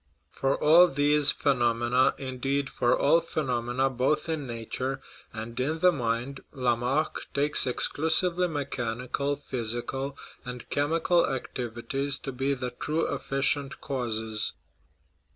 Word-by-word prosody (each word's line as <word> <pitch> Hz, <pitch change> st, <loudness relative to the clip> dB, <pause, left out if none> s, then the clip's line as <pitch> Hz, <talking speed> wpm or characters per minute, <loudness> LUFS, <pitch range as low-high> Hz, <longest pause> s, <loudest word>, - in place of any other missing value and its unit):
For 135 Hz, 0 st, 0 dB
all 165 Hz, +4 st, +7 dB
these 145 Hz, 0 st, +4 dB
phenom 120 Hz, -4 st, +1 dB
ena 125 Hz, +2 st, +3 dB
indeed, 135 Hz, +1 st, -2 dB
for 120 Hz, 0 st, +2 dB
all 165 Hz, +4 st, +4 dB
phenomena 130 Hz, -5 st, -1 dB
both 130 Hz, +5 st, 0 dB
in 155 Hz, -4 st, -2 dB
nature 120 Hz, +3 st, -4 dB, 0.3 s
and 115 Hz, +2 st, -6 dB
in 150 Hz, +5 st, 0 dB
the 180 Hz, +2 st, +5 dB
mind 125 Hz, -1 st, -2 dB
Lamarck 125 Hz, +3 st, -1 dB
takes 145 Hz, -1 st, +4 dB
exclusively 170 Hz, +7 st, +2 dB
mechanical, 140 Hz, -2 st, -2 dB
physical, 130 Hz, +1 st, -3 dB, 0.3 s
and 125 Hz, -1 st, -7 dB
chemical 165 Hz, +4 st, +2 dB
activities 135 Hz, +2 st, -3 dB
to 135 Hz, -, -6 dB
be 135 Hz, +2 st, -1 dB
the 125 Hz, -1 st, -4 dB
true 155 Hz, +6 st, -1 dB
efficient 135 Hz, 0 st, -1 dB
causes. 110 Hz, -5 st, -2 dB
135 Hz, 115 wpm, -27 LUFS, 120-145 Hz, 0.3 s, all